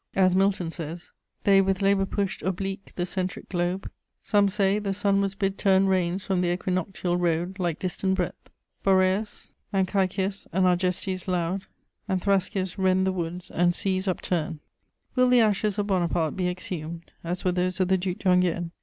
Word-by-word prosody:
As 185 -1 +4
Milton 190 -3 +2
says: 165 +1 -7 0.3
They 195 -1 +6
with 195 0 0
labour 195 0 +3
push'd 200 0 -2
Oblique 195 +1 -3
the 175 - -1
centric 185 0 -3
Globe: 180 +1 -1 0.4
some 205 -1 +3
say, 200 0 +2
the 200 -2 -2
Sun 200 -1 +2
Was 195 0 -1
bid 195 0 -1
turn 195 -1 +4
reins 185 -1 0
from 190 -2 +1
th' - - +1
equinoctial 180 0 -1
road 175 +2 -1
Like 175 -3 0
distant 190 +1 -1
breadth............. 180 -2 -4 0.3
Boreas 190 +2 +1 0.2
and 190 -2 +2
Cæcias 190 0 -1
and 185 +2 +2
Argestes 185 +1 0
loud 180 +1 -1 0.4
And 190 -2 0
Thrascias 190 -1 0
rend 190 0 +3
the 190 - +2
woods, 175 0 -5
and 175 0 +2
seas 190 0 -1
upturn. 170 -3 -1 0.5
Will 255 -1 +4
the 250 -1 +6
ashes 210 -1 +1
of 205 - 0
Bonaparte 175 -5 0
be 180 -2 0
exhumed, 170 -2 -6
as 175 +2 -4
were 180 - +3
those 180 0 -1
of 185 - +2
the 190 - +4
Duc 180 0 -2
d'Enghien? 180 -2 +2
185 Hz, 170 wpm, -26 LUFS, 180-195 Hz, 0.5 s, They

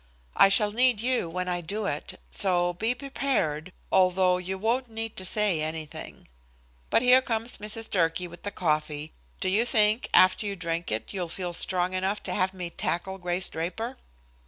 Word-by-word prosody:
"I - - +7
shall 205 +1 +4
need 245 0 +3
you 245 -6 0
when 180 +2 -3
I 175 -1 -1
do 205 +5 -4
it, 145 -6 -4
so 175 -3 +3
be 225 +7 -1
prepared, 245 - -2 0.2
although 185 0 +4
you 190 +1 -4
won't 235 +5 0
need 225 0 -5
to 185 - -4
say 200 -4 +1
anything. 155 0 -6 0.6
"But 230 - +3
here 250 +1 +7
comes 230 -1 -1
Mrs. 215 +2 -4
Durkee 170 -1 0
with 175 0 -13
the 205 - -4
coffee. 155 -4 -2 0.3
Do 190 - 0
you 200 +5 +3
think, 220 -1 +3
after 185 +3 +5
you 200 - -3
drink 170 - -3
it, 110 - -3
you'll 185 -3 -2
feel 175 +1 -4
strong 180 +1 0
enough 190 +3 -1
to 180 - -3
have 185 +1 +1
me 180 -2 -6
tackle 190 +4 -2
Grace 180 +1 0
Draper?" 225 +10 -4
185 Hz, 180 wpm, -27 LUFS, 175-220 Hz, 0.6 s, I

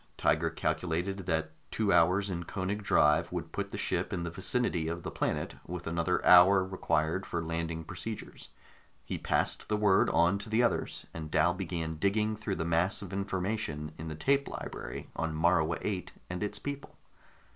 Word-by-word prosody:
Tiger - - +2
calculated 90 +3 -2
that 80 -2 0 0.2
two 105 -3 +1
hours 90 +4 +4
in 85 -1 -3
Koenig 100 +4 -3
drive 75 -6 +3
would - - -4
put - - -3
the - - -6
ship - - 0
in 85 - -2
the 85 - -3
vicinity 95 - 0
of 85 +1 -4
the - - -4
planet, - - -1
with 90 0 -5
another 85 +2 0
hour 95 +1 +8
required 85 -1 0
for 85 - -3
landing 80 0 -2
procedures. 95 +6 -7 0.6
He - - -4
passed - - 0
the 105 - +2
word 100 -2 +4
on 85 +4 +3
to 105 +2 -7
the 110 +3 +3
others, 120 - -1
and 80 -1 -6
Dal 80 +3 +3
began 85 -3 -3
digging 105 +5 +1
through 105 -2 -3
the 85 - -2
mass 85 +5 +1
of 100 - -8
information 95 -5 -2
in 80 - -5
the 80 - -4
tape 140 - +2
library - - -6
on 80 -1 -2
Morua 80 0 +2
VIII 95 -4 -2 0.2
and 90 - -4
its 105 0 -2
people. 140 +5 -6
90 Hz, 180 wpm, -31 LUFS, 80-100 Hz, 0.6 s, hour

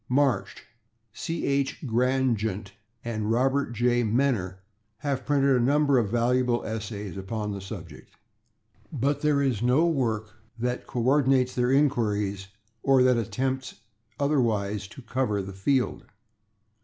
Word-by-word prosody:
Marsh, 130 -5 +1 0.5
C. 165 +8 -4
H. 140 +1 -1
Grandgent 115 -5 0 0.3
and 110 -2 -2
Robert 130 +3 +1
J. 120 +1 +2
Menner 110 -5 +1 0.4
have 130 0 -3
printed 140 -2 +3
a - - +3
number 140 0 +3
of 110 -4 0
valuable 120 +1 +1
essays 105 -3 -5
upon 105 +2 -4
the 100 -1 -5
subject, 95 - -9 0.8
but 140 +2 0
there 145 -2 +2
is 125 -6 0
no 125 +7 +3
work 115 -9 -1 0.2
that 125 +1 -3
co 120 - -2
ordinates 130 -1 +3
their 125 0 +1
inquiries 105 -8 +1 0.3
or 135 0 +4
that 125 -1 +4
attempts 130 +4 -2 0.4
otherwise 110 -9 0
to 120 +5 -12
cover 120 -5 -1
the 95 +1 -7
field. 125 +7 0
125 Hz, 130 wpm, -26 LUFS, 105-135 Hz, 0.8 s, or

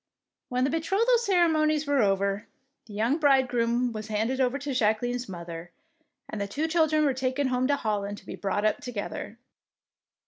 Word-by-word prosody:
When 250 0 0
the 270 - +1
betrothal 395 +10 +2
ceremonies 320 -7 +2
were 285 -2 +2
over, 200 0 0 0.4
the 210 - -11
young 235 +9 +1
bridegroom 250 -4 +2
was 215 -1 -6
handed 225 +5 -1
over 255 +1 +1
to 285 -1 -4
Jacqueline's 245 +1 0
mother, 170 -1 -7 0.6
and 210 - -5
the 200 - -2
two 295 +11 -2
children 315 -2 +2
were 275 - +2
taken 260 +1 -1
home 255 0 +1
to 285 - +3
Hol 215 -6 -1
land 200 0 -5
to - - -15
be - - -7
brought 205 +1 -1
up 215 - +1
together. 225 -1 -6
250 Hz, 175 wpm, -27 LUFS, 215-290 Hz, 0.6 s, to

